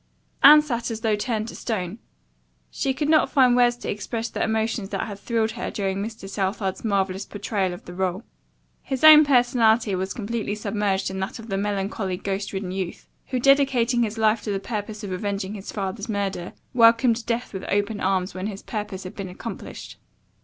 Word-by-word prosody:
Anne 300 0 +9
sat 240 -6 -2
as 225 -1 -5
though 220 -2 +2
turned 220 0 -2
to - - -8
stone. 205 -2 -3 0.7
She 270 - -1
could 290 +3 -2
not 310 0 +4
find 255 -4 +5
words 245 -1 +4
to - - -4
express 225 +3 -4
the - - -4
emotions 220 -2 -1
that - - -2
had 205 -3 -7
thrilled 225 0 0
her 235 +2 -4
during 195 -2 -2
Mr. 215 -2 -6
Southard's 195 0 -2
marvelous 195 -3 0
portrayal 200 -2 -2
of 175 - -9
the 175 - -9
role. 190 +2 -2 0.6
His 265 0 -4
own 310 0 +10
personality 240 -5 +3
was 190 +1 -2
completely 220 -1 -3
submerged 200 -2 -1
in 190 - -5
that 190 - -4
of 225 0 -11
the 195 - -1
melancholy 195 -1 -2
ghost 195 +1 -3
ridden 190 -2 -4
youth, 185 -2 -5 0.2
who, 255 - -1
dedicating 260 -3 +3
his 225 -1 -1
life 220 0 +2
to 210 - -3
the 195 - -1
purpose 210 +1 -5
of 200 - -5
avenging 195 +1 -3
his 200 -2 -7
father's 200 +2 -4
murder, 195 -4 -3 0.2
welcomed 230 0 +5
death 235 0 -2
with 190 -1 -5
open 205 +1 0
arms 190 0 0
when 185 +2 -4
his 200 -2 -7
purpose 205 -3 -5
had 185 - -8
been 195 -2 -5
accomplished. 180 - -8
210 Hz, 190 wpm, -24 LUFS, 195-235 Hz, 0.7 s, own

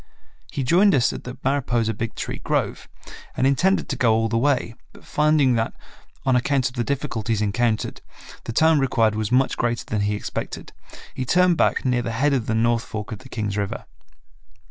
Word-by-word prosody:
He 140 - -2
joined 185 +9 +4
us 125 -2 +2
at - - -8
the 125 +1 -7
Mariposa 120 -5 0
Big 115 +1 -5
Tree - - -5
grove - - -1 0.5
and - - +2
intended 170 +9 +2
to - - -1
go 115 -3 +3
all 115 0 +1
the 115 - -1
way, 135 -3 +1 0.2
but - - -17
finding 150 -3 +3
that, 115 -1 -1 0.5
on 130 -1 +3
account 130 +1 +2
of - - -17
the 120 -2 -1
difficulties 120 -6 -2
encountered, 110 +2 -1 0.4
the - - -4
time 160 +5 +4
required 115 -5 +2
was 110 +1 -2
much 130 +2 +2
greater 120 -1 -1
than 105 -2 -2
he 105 +1 0
expected, 105 - -6 0.4
he 130 - -3
turned 180 +6 +3
back - - +1
near 125 -1 +2
the 115 -1 -4
head 140 +5 +2
of 125 -5 -1
the 110 - 0
north 115 +1 +2
fork 110 -2 -6
of 110 - -6
the 130 - -14
Kings 105 -4 -3
River. 100 -1 -3
120 Hz, 195 wpm, -23 LUFS, 110-135 Hz, 0.5 s, joined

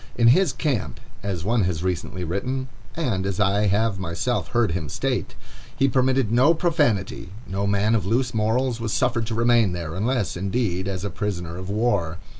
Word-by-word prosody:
"In 115 -1 +5
his 170 +5 +4
camp," 120 - -2 0.2
as 95 -5 -3
one 110 0 +2
has 90 -2 -2
recently 90 0 -2
written, 125 +10 -2 0.3
and 120 - -1
as 95 0 -2
I 100 +1 +3
have 100 0 +1
myself 90 +7 -2
heard 120 -6 +1
him 80 -4 -3
state, - - -2 0.4
"he 135 - +4
permitted 130 -3 +2
no 130 +8 +5
profanity; 145 - 0 0.2
no 100 +2 -2
man 100 +2 +2
of 110 -5 +2
loose 120 +6 0
morals 115 +2 0
was 115 -2 -2
suffered 120 -3 +1
to 115 - -3
remain 115 -4 +3
there, 85 -3 -4
unless, 110 +3 -1
indeed, 95 0 -1
as 95 0 -3
a 100 - -3
prisoner 85 -4 -3
of 95 +1 -7
war. 100 -6 0
105 Hz, 180 wpm, -24 LUFS, 95-120 Hz, 0.4 s, In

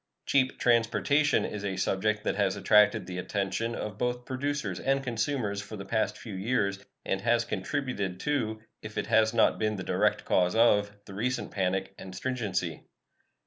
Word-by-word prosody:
"Cheap 130 -2 +2
transportation" 125 +5 +3
is 105 -1 -5
a 95 -2 -2
subject 105 +3 0
that - - 0
has 100 -1 +1
attracted 105 +1 +4
the 90 0 -5
attention 100 +5 -2
of 105 -1 -5
both 125 0 -1
producers 130 -7 -2
and 135 0 +1
consumers 115 -4 -1
for 105 +1 -8
the 100 - -7
past 110 0 0
few 110 - -8
years, 100 -1 -1 0.2
and 95 - -1
has 115 +1 +2
contributed 100 -4 -3
to, 110 -7 -1 0.2
if 110 0 -8
it - - 0
has 110 0 +4
not 115 -1 +3
been 110 -1 0
the 95 - -5
direct - - +1
cause 90 +1 +2
of, 105 -3 +4
the 100 - -10
recent 125 +6 -2
panic 95 0 -1
and 95 -1 -9
stringency. 105 -8 -2
110 Hz, 170 wpm, -29 LUFS, 95-120 Hz, 0.2 s, attracted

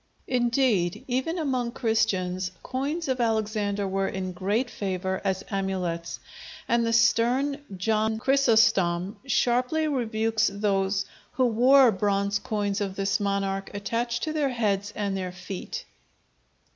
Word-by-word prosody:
Indeed, 240 -7 +1
even 265 +7 -1
among 255 -7 -1
Christians 190 -5 0
coins 285 +6 -3
of 260 -2 0
Alexander 215 -3 0
were 195 0 0
in 185 -1 -3
great 205 +8 -1
favor 190 -1 -3
as 190 -1 -1
amulets, 185 -4 -2 0.5
and 235 0 +2
the 230 - 0
stern 245 +5 +2
John 220 +3 +1
Chrysostom 220 -8 +3
sharply 250 +5 +1
rebukes 225 -5 +1
those 195 -1 0 0.3
who 255 - +2
wore 250 +2 +6
bronze 200 0 0
coins 205 -2 -2
of 195 -2 -2
this 195 0 0
monarch 195 -1 -1
attached 235 +4 -2
to 310 - -2
their 295 -3 +1
heads 205 -5 -1
and 200 -2 -2
their 185 -1 -3
feet. 190 - -7
215 Hz, 125 wpm, -26 LUFS, 195-245 Hz, 0.5 s, wore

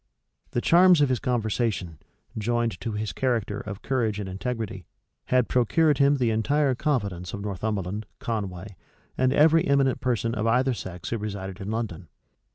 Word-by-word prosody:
The 120 - -1
charms 180 +2 +6
of 145 - +4
his 130 -2 +1
conversation, 110 - -1 0.4
joined 115 +1 -1
to 115 -2 -3
his 105 0 -3
character 115 -6 -1
of 100 0 -7
courage 115 -6 0
and 100 - -4
integrity, 95 -2 -4 0.4
had 125 -2 +2
procured 145 +4 +2
him 140 +1 +4
the 120 -3 +1
entire 135 +5 +2
confidence 100 - -2
of 100 - -6
Northumberland, 100 0 -3
Conway, 100 -7 -4 0.4
and 130 0 +2
every 160 +3 +4
eminent 135 -2 +2
person 120 -3 0
of 110 -1 -1
either 130 +3 +3
sex 90 -5 -7
who 115 - -1
resided 100 -2 -5
in 95 - -5
London. 105 -7 -4
115 Hz, 160 wpm, -26 LUFS, 100-130 Hz, 0.4 s, charms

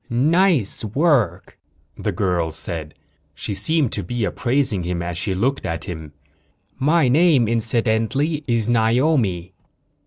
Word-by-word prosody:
"Nice 150 - +2
work," 110 - 0 0.4
the 105 - -3
girl 90 -3 -1
said. 80 -1 -4 0.4
She 100 - -4
seemed 155 +4 +1
to - - -1
be 120 -2 -3
appraising 120 0 0
him 85 0 -3
as 85 0 -4
she 95 +2 -2
looked 130 +8 -1
at 85 0 -4
him. 80 -4 -7 0.7
"My 150 +1 +3
name, 145 -3 +4
incidentally, 115 +6 0
is 115 -3 0
Naomi." 115 - +1
115 Hz, 125 wpm, -21 LUFS, 90-140 Hz, 0.7 s, name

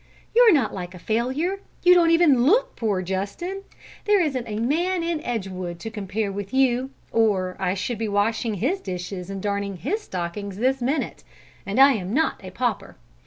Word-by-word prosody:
You're 475 -1 +8
not 275 - +2
like 180 -1 -6
a - - -8
failure. 260 - -1 0.2
You 360 - +8
don't 345 -2 +5
even 330 -7 +5
look - - +3
poor, 205 -5 -1
Justin; 200 - -3 0.4
there 415 -1 +4
isn't 270 -8 -1
a 210 -1 -4
man 335 +10 0
in 335 -2 -1
Edgewood 185 -6 -4
to 225 - -5
compare 205 -1 -3
with 200 +4 -5
you, 260 -1 +2 0.2
or 195 -5 +1
I 180 - 0
should 215 +3 -3
be 225 - -1
washing 215 +2 0
his 285 - -1
dishes 180 0 -5
and 195 -1 -5
darning 200 -1 -2
his 380 - -2
stockings 190 - -5
this 260 +4 +1
minute. 275 +6 -2 0.4
And 200 +6 -1
I 275 +1 +9
am 200 -1 -3
not 320 -8 0
a 185 - -7
pauper! 240 +5 -2
225 Hz, 180 wpm, -24 LUFS, 195-300 Hz, 0.4 s, I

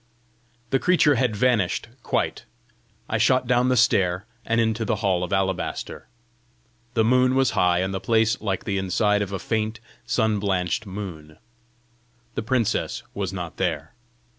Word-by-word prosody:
The 135 - +3
creature 170 -3 +4
had 125 -4 +1
vanished 110 -4 +1
quite. - - -2 0.6
I - - -1
shot 130 -1 +3
down 125 +1 +2
the 125 - +2
stair, 95 -4 +2 0.2
and 115 0 0
into 110 0 +1
the 110 - 0
hall 90 -2 +2
of 90 - -4
alabaster. 95 -2 -2 0.9
The 110 - +4
moon 125 +2 +3
was 135 -1 +3
high, 90 0 +2
and 95 +1 -2
the 95 - -2
place 110 +3 +2
like 95 -3 -2
the 100 -2 -1
inside 105 +2 +1
of 100 -1 -3
a 100 - -2
faint, 110 +3 -2 0.3
sun 110 -3 +1
blanched 95 +1 -1
moon. 85 -6 -7 1.0
The - - -2
princess 115 -1 -1
was - - -3
not - - -6
there. - - -2
110 Hz, 155 wpm, -24 LUFS, 95-120 Hz, 1.0 s, creature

